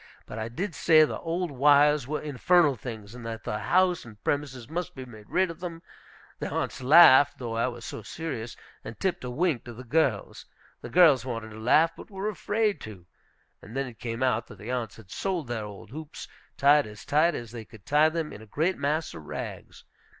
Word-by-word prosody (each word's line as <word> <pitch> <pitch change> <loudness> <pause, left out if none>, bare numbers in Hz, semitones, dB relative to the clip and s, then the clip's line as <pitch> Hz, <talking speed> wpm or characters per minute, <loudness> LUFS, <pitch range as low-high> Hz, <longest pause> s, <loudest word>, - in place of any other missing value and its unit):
But 110 - -7
I 110 +1 -3
did 175 - -4
say 155 -1 +5
the - - -5
old 170 0 -2
wires 145 0 +4
were 150 +1 -2
infernal 150 +1 +3
things, 110 -3 -8
and 125 -1 -10
that 115 -1 -6
the 105 - -3
house 180 +8 +2
and 110 -3 -13
premises 135 -5 -2
must 175 +4 -4
be 130 -1 -7
made 110 -4 -14
rid 185 -2 +1
of 165 - -12
them. 170 -2 -7 0.6
The - - -3
aunts - - -3
laughed, 145 0 +7
though 115 -3 -5
I 115 +2 +1
was 120 -2 -7
so - - -6
serious, 120 -4 -6 0.3
and 110 - -9
tipped 190 -7 -1
a 125 - -4
wink 150 0 0
to 120 - -8
the 125 +3 -10
girls. 155 +7 -1 0.3
The - - -8
girls 165 -7 +6
wanted 115 -3 -5
to 110 - -10
laugh, 155 +9 +4
but - - -12
were 195 +1 -3
afraid 210 +1 -1
to. 100 -5 -10 0.6
And 115 +6 -9
then 135 - 0
it 120 -3 -11
came 115 +1 -3
out 120 -3 +1
that - - -12
the 110 +4 -7
aunts 120 -5 -3
had 105 -4 -15
sold 185 -5 -2
their 115 -3 -3
old 105 0 -11
hoops, 155 +2 -8 0.3
tied 145 -1 +5
as 105 0 -11
tight 160 +4 +3
as 120 -2 -7
they 115 -2 -7
could 110 -3 -16
tie 150 +2 +4
them, 160 -1 -3
in 105 - -10
a 110 - -13
great 160 - -1
mass 150 +3 -1
of 75 - -10
rags. - - -7
135 Hz, 215 wpm, -27 LUFS, 115-165 Hz, 0.6 s, laughed